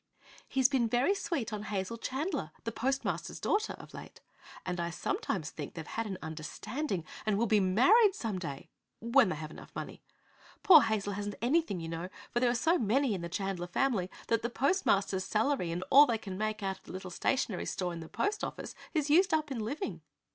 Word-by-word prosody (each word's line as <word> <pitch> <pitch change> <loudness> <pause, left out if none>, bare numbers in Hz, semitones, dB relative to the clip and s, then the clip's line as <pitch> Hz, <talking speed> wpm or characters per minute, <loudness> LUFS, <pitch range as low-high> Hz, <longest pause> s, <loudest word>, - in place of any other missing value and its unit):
"He's 265 -2 +4
been 260 -4 +1
very 245 - +3
sweet 320 - -2
on 210 - -3
Hazel 205 +1 -3
Chandler, 280 +7 -3
the 230 - -2
postmaster's 265 +5 -2
daughter, 425 +1 0
of - - -12
late, - - -10 0.5
and 180 -1 -3
I 170 0 -1
sometimes 375 - -2
think - - -7
they've - - -6
had 225 -1 -3
an 190 -3 -4
understanding 175 - -4 0.2
and 215 -2 +1
will 230 - +2
be 215 -1 +4
married, 360 - +5
some 215 - -3
day 140 -6 -7 0.3
when 235 -1 +4
they 160 - -1
have 155 +1 -7
enough - - -11
money. - - -6 0.6
Poor 335 -6 +9
Hazel 215 -3 0
hasn't 205 0 -4
anything, 255 - +1
you 165 - -5
know, 165 +2 -4 0.2
for 240 - +1
there 245 0 +3
are 240 - +1
so 325 +9 +2
many 245 +3 +2
in 185 - -3
the 170 - -5
Chandler 190 -1 -3
family 195 -2 0 0.2
that 230 -1 +2
the 235 - -1
postmaster's 200 - +1
salary 220 -3 0
and 175 +2 -3
all 290 +2 +9
they 235 -2 +1
can 195 -4 -7
make 215 +1 -2
out 190 -1 -2
of - - -30
the - - -10
little 185 0 -6
stationery 225 0 0
store 180 -2 -2
in 170 - -6
the 160 - -9
post 415 +1 -1
office - - -5 0.2
is 300 -2 +1
used 365 +3 +5
up 305 -2 -2
in 255 - -2
living." 280 - -4
220 Hz, 205 wpm, -31 LUFS, 190-275 Hz, 0.6 s, Poor